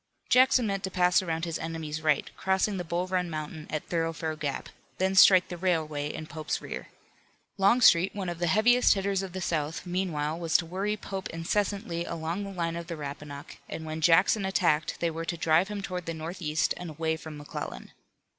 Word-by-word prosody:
Jackson 255 -1 +5
meant 195 -2 -2
to 190 - -1
pass 180 0 +3
around 165 -2 -2
his 165 -2 -3
enemy's 160 -1 -4
right, 155 -3 0
crossing 190 +1 +1
the 180 - -3
Bull 175 +2 -1
Run 185 -1 -1
Mountain 155 0 -6
at 155 - -2
Thoroughfare 165 -1 -2
Gap, 145 -3 -4 0.3
then 190 +1 +1
strike 185 -1 +7
the 175 - -5
railway 155 -5 -1
in 155 - -6
Pope's 155 0 -3
rear. - - -7 0.7
Longstreet, 195 -3 +5
one 195 -3 -3
of 175 -1 -4
the 175 - +1
heaviest 235 +8 +5
hitters 195 0 0
of 190 -2 -6
the 185 - -4
South, 160 -1 -2
meanwhile 170 -4 -2
was 165 -2 +3
to 170 - -3
worry 195 +5 -2
Pope 195 -2 -5
incessantly 175 +1 -1
along 165 +4 -3
the 195 - -6
line 170 -3 -2
of 170 0 -6
the 170 -2 -5
Rappahannock, 145 0 -8
and 160 - -6
when 155 0 -5
Jackson 175 +6 +4
attacked 170 -5 +1
they 170 -1 +1
were 165 +1 -5
to 170 - -3
drive 160 +3 +3
him 205 -1 -5
toward 180 -3 -5
the 165 - -3
northeast 160 -1 -1
and 175 -1 -6
away 160 +1 -1
from 160 -1 -9
McClellan. 145 0 -7
170 Hz, 195 wpm, -28 LUFS, 160-190 Hz, 0.7 s, strike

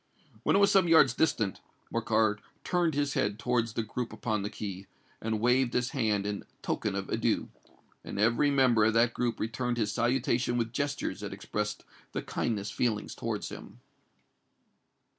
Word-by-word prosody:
When - - +2
it - - +5
was 200 - +5
some 190 -3 +5
yards 160 -7 +6
distant, 115 -9 0 0.3
Morcar 110 -2 +2 0.2
turned 175 -4 +1
his 145 -1 0
head 100 0 0
towards 120 -1 0
the 115 - -1
group 115 +3 -4
upon 110 -3 -2
the 100 - -3
quay, 100 -3 -6 0.3
and 110 -1 -1
waved 125 +2 +2
his 125 0 +1
hand 110 -6 0
in 105 -1 -3 0.2
token - - -1
of - - -3
adieu;—and - - -4
every 115 +7 +3
member 130 -5 +4
of 110 +1 +2
that 115 +1 +4
group 120 -1 -1
returned 120 +2 -2
his 105 -3 0
salutation 120 0 +1
with 115 -1 -1
gestures 145 +2 -2
that - - -5
expressed 105 -1 -4 0.3
the - - -3
kindest 105 -3 -2
feelings 110 -4 -1
towards - - -3
him. - - -10
115 Hz, 160 wpm, -30 LUFS, 105-125 Hz, 0.3 s, yards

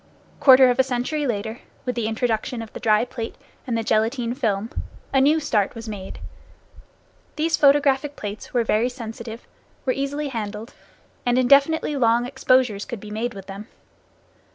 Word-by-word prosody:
Quarter 260 -2 +7
of 245 - -3
a - - +7
century 265 +4 -2
later, 220 0 -3 0.3
with 250 - -1
the 235 -2 -2
introduction 225 +1 -1
of 220 - -12
the - - -7
dry 215 0 +3
plate 235 -2 -6 0.3
and 235 -2 0
the 225 - -1
gelatine 230 +3 0
film, 220 -3 -1 0.4
a 270 - +4
new 300 +4 +4
start 220 -8 0
was 230 0 -8
made. 195 -3 -7 1.2
These 320 +1 +1
photographic 285 0 +3
plates 205 0 -7
were 240 -2 +2
very 225 +2 +1
sensitive, 230 -2 -8 0.4
were 255 - +2
easily 280 +2 -2
handled, 220 -2 -5 0.5
and 245 0 +2
indefinitely 280 +4 +4
long 235 -1 +3
exposures 250 -5 +2
could 235 - -6
be 210 +1 -10
made 225 +2 -3
with 195 -1 -9
them. 200 +3 -8
240 Hz, 160 wpm, -23 LUFS, 220-265 Hz, 1.2 s, Quarter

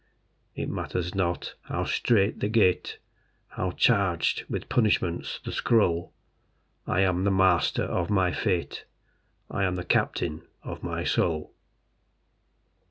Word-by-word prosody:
It - - -3
matters 90 -1 -3
not 90 -2 -1
how - - -2
strait 105 -3 +2
the 105 - -1
gate, 105 -5 +2 0.5
How 95 - -2
charged 95 -4 +2
with - - -4
punishments 105 -7 0
the - - -4
scroll, 85 -8 +2 0.8
I 95 - +2
am 90 -1 +2
the 100 - +3
master 95 -2 +3
of 85 -2 -2
my 95 -3 +2
fate: 90 -5 -2 0.7
I 100 - -1
am 90 -1 +1
the 90 - -4
captain 80 -2 0 0.2
of - - -7
my - - -3
soul. 80 -3 0
90 Hz, 125 wpm, -27 LUFS, 85-100 Hz, 0.8 s, the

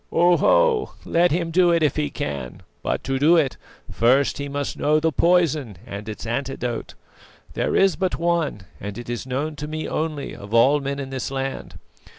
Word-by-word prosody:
"Oho, 425 - +3
let 175 +1 +3
him 170 +1 -1
do 180 +1 +4
it, 170 -1 +3
if 150 - +2
he 150 -1 0
can; 70 - -5 0.2
but - - -2
to 135 0 -1
do 155 +5 +5
it, 145 -5 +1 0.3
first 130 +6 +2
he 140 0 -4
must 145 0 -3
know 150 +1 +2
the 160 +1 +1
poison 155 - +2
and 105 +2 -7
its 110 - -7
antidote. 125 -1 -3 0.6
There - - -1
is 195 -1 +4
but 185 -2 -1
one, 170 - 0 0.2
and 100 0 -6
it 120 0 -6
is 120 +2 -4
known 145 +4 -2
to 150 - -5
me 155 +1 -4
only 155 -2 -3
of 100 +3 -6
all 135 +6 +5
men 140 0 -3
in 135 -1 -6
this 130 -1 -3
land. 135 0 -4
145 Hz, 185 wpm, -23 LUFS, 130-165 Hz, 0.6 s, do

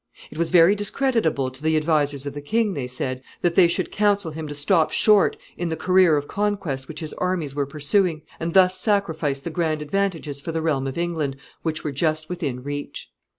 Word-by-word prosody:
It - - -10
was 170 - +2
very 175 +1 +6
discreditable 205 - 0
to 130 +2 -13
the 160 0 +2
advisers 145 -3 +1
of 140 - -4
the 145 - -6
king, 220 +6 0
they 135 -6 -3
said, 130 +1 -4 0.2
that 175 -1 +2
they 175 -1 +6
should 175 +2 -1
counsel 205 -4 +1
him 155 0 -6
to 145 - -6
stop 155 +3 +2
short 210 -3 +4 0.2
in 175 -1 -2
the 160 - -2
career 180 -1 +4
of 145 0 -3
conquest 195 -11 -2
which 155 0 -8
his 155 - -5
armies 180 -6 -1
were 140 -1 -1
pursuing, 155 +3 +1 0.2
and 165 +1 -3
thus 185 -1 +5
sacrifice 160 -9 0
the 170 - -5
grand 160 -2 -1
advantages 160 -5 -2
for 165 - -4
the 160 0 -2
realm 140 -4 0
of 135 - -5
England 160 -5 -2 0.2
which 155 -1 -3
were 150 - -2
just 155 +2 -1
within 145 -9 -4
reach. 145 +1 -6
160 Hz, 205 wpm, -23 LUFS, 145-185 Hz, 0.2 s, very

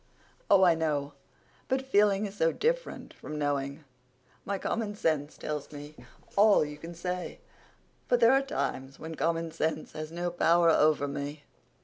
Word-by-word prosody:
"Oh, 195 -1 +6
I 175 -2 +6
know. 150 -3 -1 0.5
But 265 0 0
feeling 205 -4 +3
is 195 - -6
so 165 -4 +2
different - - -2
from 150 - -8
knowing. 145 0 -2 0.6
My 200 0 -2
common 210 +1 -2
sense 155 -6 -1
tells 150 -2 -5
me 145 0 -9 0.4
all 205 -5 +5
you 150 0 -8
can 170 +2 -9
say, 180 +1 -4 0.7
but 245 - +3
there 230 +2 +6
are 270 - +4
times 135 - -3
when 160 +1 -7
common 165 +1 -1
sense 160 -1 -2
has 155 0 -6
no 175 +1 -3
power 170 -1 +4
over 150 -2 +3
me. 145 +1 -5
165 Hz, 155 wpm, -29 LUFS, 150-200 Hz, 0.7 s, Oh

